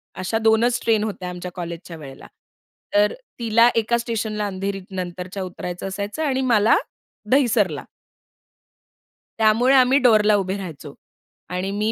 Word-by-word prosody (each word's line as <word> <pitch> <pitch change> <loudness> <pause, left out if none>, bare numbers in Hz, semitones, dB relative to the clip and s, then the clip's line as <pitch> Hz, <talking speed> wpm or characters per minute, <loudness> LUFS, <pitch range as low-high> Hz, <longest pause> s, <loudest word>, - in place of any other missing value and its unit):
अशा 185 +4 -2
2ch 225 +2 +3
train 220 -2 +2
होत्या 195 -4 -4
आमच्या 180 0 -7
कॉलेजच्या 170 -1 -7
वेळेला 135 -3 -11 0.7
तर 205 0 +3 0.3
तिला 230 0 +4
एका 230 +1 +2
स्टेशनला, 220 -3 -2
अंधेरीनंतरच्या 190 -1 -5
उतरायचं 180 0 -6
असायचं 200 +10 -4
आणि 265 -3 0
मला 215 0 +5 0.6
दहिसरला 220 - +2 1.6
त्यामुळे 225 +5 +4
आम्ही 260 +1 +5
डोअरला 215 -4 +4
उभे 190 -1 -1
राहायचो, 155 -7 -8 0.6
आणि 185 +2 -3
मी 210 +2 0
205 Hz, 120 wpm, -22 LUFS, 185-230 Hz, 1.6 s, मला